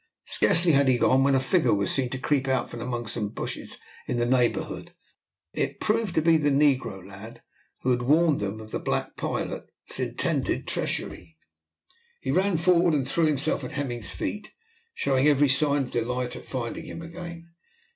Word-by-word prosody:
Scarcely 170 0 +3
had 140 -2 +4
he 130 -1 +4
gone, 130 +2 +4
when 140 0 +3
a - - +4
figure 145 - +2
was 100 -1 0
seen 130 -2 +1
to 130 - -4
creep 135 0 0
out 130 -1 0
from 120 - -7
among 120 -1 -3
some 105 -1 -2
bushes - - -6 0.3
in 125 - -1
the 120 - +1
neighbourhood. 125 -1 0 0.6
It - - -2
proved 215 -4 0
to 160 - +2
be 165 0 +5
the 145 -1 +1
negro 135 -9 +2
lad 110 +4 -11 0.4
who 130 - +1
had 125 -1 +1
warned 155 +4 +3
them 100 +2 -3
of 110 0 -10
the - - -2
black - - -2
pilot's - - -5
intended - - -1
treachery. 80 -2 -4 0.8
He - - -2
ran 190 -1 +2
forward 170 -1 +4
and 135 -3 0
threw 160 +3 +2
himself 150 -1 0
at 125 - -6
Hemming's 120 -8 -3
feet, 210 0 -4 0.5
showing 135 0 +2
every 145 -1 +4
sign 140 +1 +2
of 125 - -8
delight 125 +1 -2
at - - -9
finding 130 +5 -4
him 165 +1 -7
again. 170 0 -9
135 Hz, 180 wpm, -26 LUFS, 120-160 Hz, 0.8 s, be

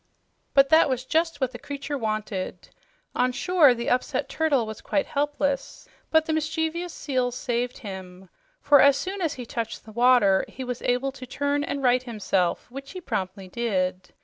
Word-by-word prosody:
But 275 0 +6
that 315 -2 +6
was 255 -1 -2
just 325 +1 0
what 260 -2 0
the 240 - -9
creature 285 0 -5
wanted. 215 -5 -3 0.4
On 250 0 +2
shore 295 -1 +4
the 235 0 -2
upset 250 - 0
turtle 290 -7 +1
was 220 0 -7
quite 290 - 0
helpless; 285 -1 -2 0.2
but 320 -1 +4
the 315 - -1
mischievous 320 +3 -1
seals 255 -5 -2
saved 245 -1 -2
him. 190 -3 -9 0.3
For 285 -1 +6
as 280 -1 +6
soon 385 +1 -4
as 325 -4 0
he 250 - -7
touched 230 -1 -5
the 220 - -11
water, 235 -5 +4
he 260 - -8
was 250 -1 -4
able 250 +2 0
to 265 -1 -10
turn 285 +2 -1
and 280 -1 -3
right 250 0 +4
himself, 205 -7 -1
which 275 +4 -8
he 370 - -6
promptly 190 - -4
did. 185 -4 -2
255 Hz, 175 wpm, -25 LUFS, 225-290 Hz, 0.4 s, But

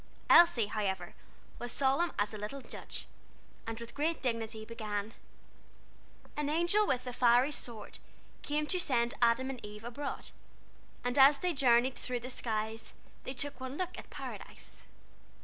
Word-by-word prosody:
Elsie, 335 -10 +7
however, 195 -4 -2 0.5
was 240 0 -4
solemn 275 +7 +2
as 205 +1 0
a - - -5
little 215 +7 -5
judge, - - -5 0.6
and 225 0 -4
with 235 0 -8
great 315 +3 0
dignity 225 -3 -2
began: 215 -1 -4 1.2
"An 295 -1 -1
angel 345 +7 +3
with 255 -1 0
a 250 - -4
fiery 245 +3 +4
sword, 230 -7 -6 0.4
Came 300 +1 -1
to 365 +4 0
send 240 -7 +2
Adam 240 +3 +3
and 255 - -8
Eve 210 +1 -9
abroad 260 +4 -5 0.7
And 245 +2 0
as 275 +2 +8
they 360 +3 0
journeyed 255 -2 +4
through 250 -1 -3
the 255 +2 -4
skies 220 -2 -3 0.3
They 260 - -4
took 275 +1 -2
one 260 +2 -5
look 365 -1 -2
at - - -10
Paradise. - - -9
245 Hz, 150 wpm, -32 LUFS, 225-285 Hz, 1.2 s, as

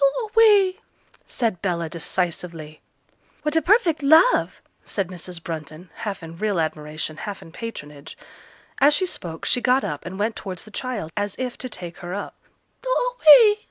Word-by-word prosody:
'Do 425 - +1
away!' 415 -4 +5 0.5
said 225 -8 -2
Bella, 170 -3 -1
decisively. 165 -2 -3 0.6
'What 300 0 -1
a 325 - +4
perfect 345 -3 +3
love!' 315 - +4 0.2
said 195 -4 -3
Mrs. 175 -1 -8
Brunton, 160 +1 -7
half 200 -5 -5
in 165 +1 -10
real 210 -4 0
admiration, 155 0 -3
half 205 +1 -6
in 165 - -14
patronage. 155 -9 -8 0.6
As 290 +2 +6
she 370 - +1
spoke, 170 - -6
she 245 - +2
got 255 +2 +3
up 145 -1 -4
and 185 +1 -7
went 215 +2 -1
towards 185 -4 -7
the 215 - -14
child, 215 -8 -4
as 205 -1 -2
if 255 -1 -3
to 255 - -5
take 175 -5 -8
her 175 +1 -6
up. 205 - -5 0.5
'Do - - -5
away! 460 -4 +6
205 Hz, 165 wpm, -23 LUFS, -, 0.6 s, As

